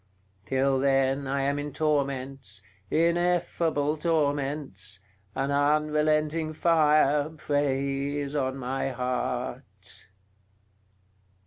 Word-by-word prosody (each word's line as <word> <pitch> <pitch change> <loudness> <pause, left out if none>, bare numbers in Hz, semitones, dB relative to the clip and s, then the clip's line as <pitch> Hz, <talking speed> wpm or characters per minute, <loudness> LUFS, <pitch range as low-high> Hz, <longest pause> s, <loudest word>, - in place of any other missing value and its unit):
Till 135 0 +2
then 135 0 +2
I 135 0 0
am 140 +1 0
in 145 0 -4
torments, 135 -8 -2 0.3
ineffable 170 -3 +1
torments! 145 - -1 0.3
an 135 +1 -1
unrelenting 155 +2 +1
fire 150 -3 +3
preys 145 -1 -1
on 135 -2 -1
my 135 +1 -2
heart." 125 -4 -4
140 Hz, 80 wpm, -27 LUFS, 135-150 Hz, 0.3 s, fire